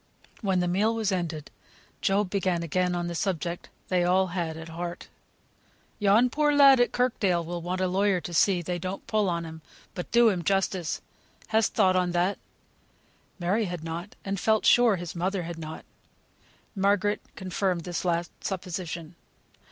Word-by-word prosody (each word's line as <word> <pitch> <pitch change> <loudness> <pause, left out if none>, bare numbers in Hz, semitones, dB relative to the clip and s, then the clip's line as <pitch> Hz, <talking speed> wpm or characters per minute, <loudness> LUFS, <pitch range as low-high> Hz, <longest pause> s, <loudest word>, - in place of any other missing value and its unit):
When 190 -4 +1
the 180 - 0
meal 205 +6 +1
was 220 -3 0
ended 170 -5 -3 0.5
Job 195 -1 +1
began 185 -4 0
again 180 +2 0
on 175 0 -2
the 175 - -3
subject 175 -1 -3 0.2
they 180 -1 +2
all 185 +2 +3
had 165 -3 -2
at 160 0 -8
heart. 170 +1 -6 0.9
"Yon 210 +4 +5
poor 300 +1 +2
lad 275 -2 +7
at 245 - +3
Kirkdale 200 -9 +1
will 175 +1 -4
want 180 +2 -3
a 185 - +2
lawyer 195 +1 +2
to 175 +1 -7
see 180 +1 +3
they 175 +1 -3
don't 185 +2 -5
put 215 -2 +1
on 170 -2 -1
him, 160 0 -9 0.3
but 180 - -6
do 235 0 +6
him 180 -4 -1
justice. 190 -2 0 0.5
Hast 220 0 +2
thought 190 -4 +4
of 180 -1 +1
that?" 180 +3 +1 1.0
Mary 195 +5 0
had 175 -3 -5
not, 165 +4 -6
and 195 -1 -2
felt 220 +1 +2
sure 240 -4 +6
his 175 -1 -6
mother 185 +2 -1
had 170 0 -6
not. 155 0 -7 0.9
Margaret 205 +1 +1
confirmed 185 -1 -1
this 175 0 -4
last 170 -1 0
supposition. 180 -3 -4
185 Hz, 165 wpm, -27 LUFS, 175-200 Hz, 1.0 s, lad